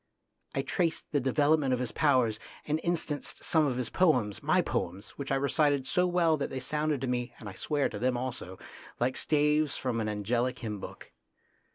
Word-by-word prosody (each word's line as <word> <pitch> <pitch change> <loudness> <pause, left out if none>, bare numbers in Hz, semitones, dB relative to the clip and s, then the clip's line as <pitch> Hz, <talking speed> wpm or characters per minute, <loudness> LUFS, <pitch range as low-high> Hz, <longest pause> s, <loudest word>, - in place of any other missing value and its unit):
I - - 0
traced 170 -3 -1
the 145 - +2
development 145 +1 +2
of 125 - 0
his 125 -3 -2
powers, 125 -7 +2 0.3
and 155 +1 0
instanced 160 -4 -2
some 160 -3 +3
of 125 -3 -1
his 125 - -2
poems, 125 - +2
my - - +3
poems, 95 +4 -3
which 140 -1 -6
I - - +3
recited 140 0 +2
so 180 +6 +2
well 170 -3 +3
that 140 - -2
they 130 - -4
sounded 150 +1 -1
to 135 - -1
me, 125 -1 -2
and 110 - -10
I 95 - -6
swear 145 +8 0
to 105 - -6
them 125 +1 +1
also, 120 -7 -5 0.4
like 125 +2 +1
staves 150 -1 +2
from 120 -3 -1
an 110 - -1
angelic 120 +4 -1
hymn 105 -4 -5
book. - - -10
135 Hz, 195 wpm, -30 LUFS, 120-150 Hz, 0.4 s, some